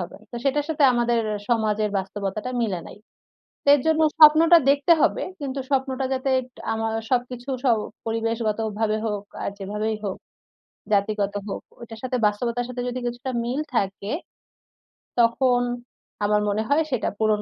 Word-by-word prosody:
হবেন। 175 - -7
তো - - -5
সেটার 285 +1 +1
সাথে 300 -2 +2
আমাদের 240 -1 +2 0.3
সমাজের 215 -2 +1
বাস্তবতাটা 200 +4 -4
মিলে 190 -6 -1
নাই। - - -12 0.8
এর 290 - +7
জন্য 320 0 +3 0.2
স্বপ্নটা 320 +2 +8
দেখতে 285 +4 +3
হবে - - +2 0.2
কিন্তু 275 -1 -4
স্বপ্নটা 265 -1 0
যাতে 265 +1 -1 0.4
আমার 225 0 -1 0.2
সবকিছু 245 +1 -1 0.2
সব 235 -3 +4 0.3
পরিবেশগতভাবে 225 -1 -1
হোক 205 -1 -3 0.2
আর - - -1
যেভাবেই 210 +3 -2
হোক 190 - -3 0.8
জাতিগত 205 0 +1
হোক, - - -4 0.2
ওইটার 225 -1 -9
সাথে 255 0 -1
বাস্তবতার 235 +3 -1
সাথে 250 0 -4
যদি 250 +1 -3
কিছুটা 245 +2 -4
মিল 255 +5 -1
থাকে 200 0 -1 1.1
তখন 245 +1 +3 0.6
আমার 210 0 +3
মনে 215 +2 0
হয় 295 +3 +4
সেটা 250 - 0
পূরণ 215 -1 +2
230 Hz, 140 wpm, -24 LUFS, 210-260 Hz, 1.1 s, স্বপ্নটা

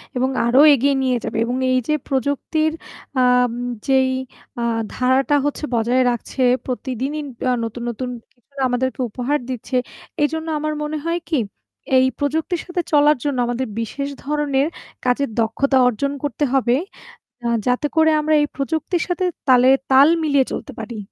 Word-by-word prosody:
এবং 255 +1 +1 0.2
আরও 245 +4 +5
এগিয়ে 275 +1 +2
নিয়ে 255 -1 +1
যাবে - - -3
এবং 245 +1 -2 0.2
এই 255 - +3
যে 305 - +2
প্রযুক্তির 285 +4 0 0.5
আম 250 -1 +4 0.4
যেই 265 -1 +3 0.5
আ - - -1 0.3
ধারাটা 260 +3 +2
হচ্ছে 290 +1 -2
বজায় 240 +3 +2
রাখছে 240 +3 -5 0.2
প্রতিদিনই, 265 +4 -3 0.2
আ - - +3
নতুন, 230 +1 -5
নতুন 250 +2 -4 0.2
কিছুনা 270 +3 -11
আমাদেরকে 250 0 -1
উপহার 255 +7 -1
দিচ্ছে 255 +1 -4 0.5
এইজন্য 320 +2 -1
আমার 305 0 -2
মনে 300 +1 -3
হয় 335 +1 0
কি, 310 -5 +2 0.6
এই 260 - +5
প্রযুক্তির 315 +4 -1
সাথে 350 0 -2
চলার 295 -1 +5
জন্য 285 -3 -1
আমাদের 245 +1 -2
বিশেষ 275 +5 -3 0.2
ধরনের 290 -1 0 0.4
কাজের 250 +2 +1
দক্ষতা 265 +5 +1
অর্জন 250 +4 0
করতে 290 +1 -2
হবে, 250 -2 +3 0.7
আ - - +1 0.2
যাতে 250 +4 +1
করে 320 0 +5
আমরা 310 +1 +1
এই 295 - +1
প্রযুক্তির 320 +5 -1
সাথে 360 0 -1 0.2
তালে 255 0 +6 0.2
তাল 270 +2 +7 0.2
মিলিয়ে 280 -3 +3
চলতে - - -5
পারি। 225 +1 -6
270 Hz, 155 wpm, -20 LUFS, 250-295 Hz, 0.7 s, তাল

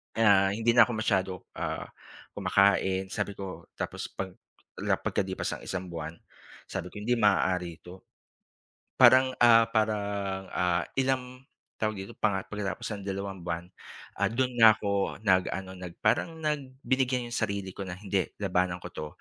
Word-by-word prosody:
Kaya, 100 -3 +5
ah, - - +1
hindi 115 +2 +2
na 120 0 +8
ako - - -4
masyado, 100 -4 +1 0.3
ah, - - -3 0.5
kumakain 95 -1 +2
sabi 100 - -2
ko 95 -4 -8
tapos - - -4
'pag 95 0 -4 0.5
la - - 0
pagkalipas 95 -1 -2
ng - - -15
isang 95 -1 -4
buwan 80 -2 -5 0.6
sabi 95 -2 -4
ko, 105 - -7
"Hindi 120 +3 +1
maaari 90 -5 +2
ito." 90 +1 -12 1.0
Parang, 130 +1 +7
ah, 115 -1 +8
parang, 100 -3 -1
ah, 90 -2 +1
ilang, 130 -1 -1 0.4
tawag 110 -1 0
dito 95 0 -7
panga 100 -3 0
pagkatapos 100 -3 -4
ng 100 - -8
dalawang 95 -1 -4
buwan, 85 0 -3 0.6
ah, - - +3
do'n 125 +2 0
na 115 -2 +8
ako 100 -1 -1
nag-ano 95 -1 +1
nag 90 -1 -9
parang 165 -1 +1
nag 145 -4 -3
binigyan 130 -2 +1
yung 120 - -6
sarili 100 -4 -2
ko - - -6
na, 95 -2 -6
"Hindi 100 -1 0 0.2
labanan 90 -3 0
ko 90 - -8
'to 75 - -4
100 Hz, 160 wpm, -28 LUFS, 95-115 Hz, 1.0 s, na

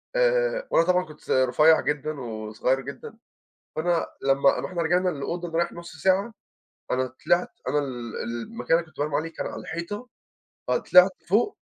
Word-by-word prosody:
آآ - - +2
وأنا 165 - +4
طبعًا 180 0 +3
كنت 155 -1 -14
س - - -19
رُفيّع 130 +5 +5
جدًا، 150 0 -2
وصغير 110 +3 -2
جدًا. 140 - -9 0.6
فأنا 170 +1 +1 0.2
لمّا 140 0 +3
رحنا 175 -2 -3
رجعنا 180 +3 +2
للأوضة 175 +3 -3
نريّح 170 +1 0
نُص 170 -1 -10
ساعة، 190 +8 +2 0.6
أنا 130 0 +1 0.2
طلعت 175 +1 +3 0.2
أنا 145 +3 +2
ال 120 -5 -5
المكان 120 - -1
اللي 170 - -3
كنت - - -26
بانام 145 0 -1
عليه 165 +2 -2
كان - - -4
على - - -7
الحيطة، 190 +9 -5 0.6
ف - - -1
طلعت 180 +1 +6 0.2
فوق 220 - +2
165 Hz, 165 wpm, -25 LUFS, 140-180 Hz, 0.6 s, طلعت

